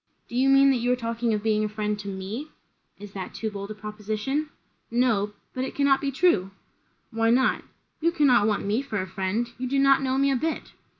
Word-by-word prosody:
"Do - - -9
you 265 +2 +3
mean, 275 0 +6
that 260 - +2
you 245 +1 +1
are - - +4
talking 230 -1 -2
of 210 -1 -1
being 215 -1 +2
a 215 - -1
friend 210 0 -2
to 200 - -7
me?" 200 +9 -5 0.5
"Is 205 -1 -10
that 190 -2 -7
too 220 -1 -3
bold 200 0 -6
a 215 - -6
proposition?" 215 +8 -3 0.4
"No 230 -4 +1 0.2
but 255 - -2
it - - -5
cannot 280 -1 +3
be 280 - -1
true." 270 - +2 0.6
"Why 225 0 +1
not?" 250 +3 +2 0.4
"You 335 +1 +2
cannot 265 -10 +4
want 210 -2 0
me 210 +5 +1
for 220 -7 -3
a 185 - -2
friend. 190 +5 -2
You 255 0 -3
do 275 - 0
not 275 0 +5
know 260 -1 0
me 275 0 +3
a - - +2
bit." 315 +5 -3
230 Hz, 225 wpm, -26 LUFS, 210-270 Hz, 0.6 s, mean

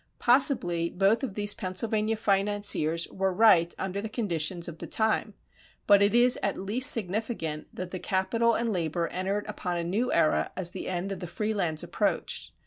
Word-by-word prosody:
Possibly 240 - +2
both 195 +6 +2
of 220 -8 -4
these 205 0 +2
Pennsylvania 215 +4 -2
financiers 200 -6 +1
were 190 0 -1
right 180 -4 +4
under 190 +1 -3
the 220 - -5
conditions 175 -6 -2
of 165 -2 -9
the - - -7
time; 220 -1 0 0.5
but 200 -1 +5
it 205 +3 +3
is 245 +1 +4
at 200 - -1
least 245 +9 +4
significant 200 - -2
that 180 -1 -5
capital 230 +5 +1
and 230 -2 -1
labor 170 -1 -2
entered 195 +3 -2
upon 180 -1 -4
a 170 - -2
new 210 +9 -1
era 160 -2 +1
as 180 -2 -2
the - - -6
end 185 +2 -3
of 195 - -5
the 180 - -6
free 210 +5 -3
lands 165 -7 0
approached. - - -2
195 Hz, 175 wpm, -27 LUFS, 175-220 Hz, 0.5 s, but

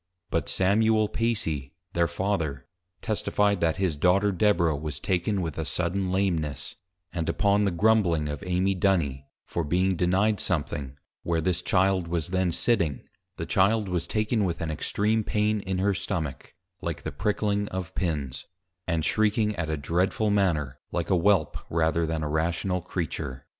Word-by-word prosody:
But 75 -3 0
Samuel 110 +6 +3
Pacy, 80 - -1 0.2
their 85 0 +2
Father, 85 -7 -2 0.4
testifi'd, 105 -2 +1
that 80 -2 +2
his 95 -5 0
Daughter 95 +6 +3
Deborah 90 -5 +2
was 75 +1 -5
taken 95 +1 0
with 80 -2 -4
a - - 0
sudden 90 +4 -1
Lameness; 85 -8 -1 0.4
and 85 -3 -2
upon 100 0 +2
the - - +3
grumbling 90 -5 +3
of 75 +6 -5
Amy 95 +2 +1
Duny, 85 -8 +1 0.2
for 85 - -2
being 90 +5 +1
denied 95 +4 +2
something, 75 -5 -2 0.2
where 85 -1 0
this 90 +1 0
Child 95 -1 +2
was 85 -2 -2
then 95 -1 +1
sitting, 85 - +1 0.3
the - - -3
Child 105 +2 +2
was 85 -1 -1
taken 110 +2 0
with 85 -3 -1
an 80 -1 -2
extream 105 +8 0
pain 105 +1 +1
in 95 -1 -3
her 100 +2 +2
stomach, 80 -8 -4 0.3
like 85 -4 -4
the 80 - -3
pricking 105 +5 0
of 95 -3 -5
Pins; 75 -7 -3 0.4
and 80 -3 0
shrieking 105 +3 +2
at 85 -4 -3
a 80 - -1
dreadful 90 +8 0
manner, 85 -10 +1
like 85 0 -2
a - - +5
Whelp, 90 -3 +2
rather 80 0 +1
than 80 -1 -2
a - - -1
Rational 85 +4 0
Creature. 80 -7 -4
90 Hz, 160 wpm, -27 LUFS, 80-100 Hz, 0.4 s, a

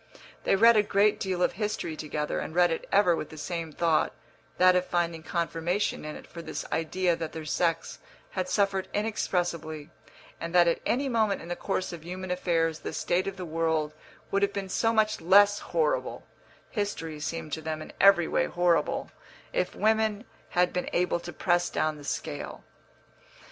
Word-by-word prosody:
They - - +4
read 230 +4 +7
a 210 - +6
great 205 +1 +2
deal 185 -3 -1
of - - +3
history 210 -6 -3
together, 150 -1 -3
and 160 - -6
read 175 -1 +5
it 165 - -3
ever 190 -4 +5
with 155 - -5
the 155 - -11
same 165 0 -4
thought 165 0 +1 0.4
that 185 0 +6
of 180 - +3
finding 170 -2 -1
confirmation 170 +3 -1
in 155 - -5
it - - -10
for 170 - -9
this - - -5
idea 175 +2 +1
that 165 -2 -5
their 160 -1 -6
sex 165 +1 -1 0.3
had 185 -1 -2
suffered 195 -2 +1
inexpressibly, 175 -7 -2 0.5
and 165 +1 -5
that 175 -1 +6
at 170 - +1
any 275 +3 +1
moment 220 -5 +1
in 170 - -10
the 175 - -2
course 185 -1 -2
of 165 -2 -8
human 185 +2 -5
affairs 165 -3 0
the - - -6
state 180 +2 0
of 195 0 -4
the 185 - -5
world 160 -2 0 0.4
would 200 - +2
have 200 0 +2
been 195 -1 -4
so 225 +4 +2
much 215 -2 +1
less 205 +4 +6
horrible - - -1 0.5
(history 165 -8 -3
seemed 160 0 -4
to 160 - -2
them 155 0 -3
in 155 - -9
every 195 -4 +6
way 175 - +1
horrible) 175 -1 +1 0.4
if - - -1
women 220 0 +1 0.3
had 180 0 +3
been 180 - -2
able 175 0 +1
to 175 0 -7
press 175 0 +1
down 155 -1 -1
the 145 - -11
scale. 140 - -5
175 Hz, 185 wpm, -28 LUFS, 165-200 Hz, 0.5 s, read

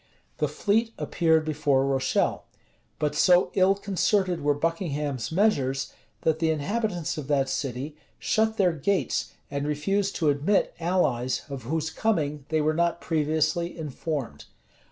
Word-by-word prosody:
The - - +2
fleet 225 +2 0
appeared 160 -2 +2
before 145 -3 +1
Rochelle; 135 -1 0 0.5
but 150 -1 0
so 180 0 +4
ill 190 +1 +4
concerted 195 -3 0
were 145 0 +2
Buckingham's 145 - -2
measures, 140 -9 +1 0.3
that 160 -1 +1
the 165 -1 +2
inhabitants 175 +1 -1
of 140 - -7
that 140 -2 +2
city 135 +2 -3 0.2
shut 220 0 +1
their 180 -4 +3
gates 185 +5 -1 0.2
and 140 0 -2
refused 195 +7 0
to 155 -3 +2
admit 145 +8 +1
allies 150 -8 0
of 135 -4 -6
whose 160 0 -1
coming 150 -9 -1
they 160 -1 +1
were 155 +1 +2
not 170 +1 +1
previously 160 +2 0
informed. 145 - -4
155 Hz, 135 wpm, -26 LUFS, 145-185 Hz, 0.5 s, so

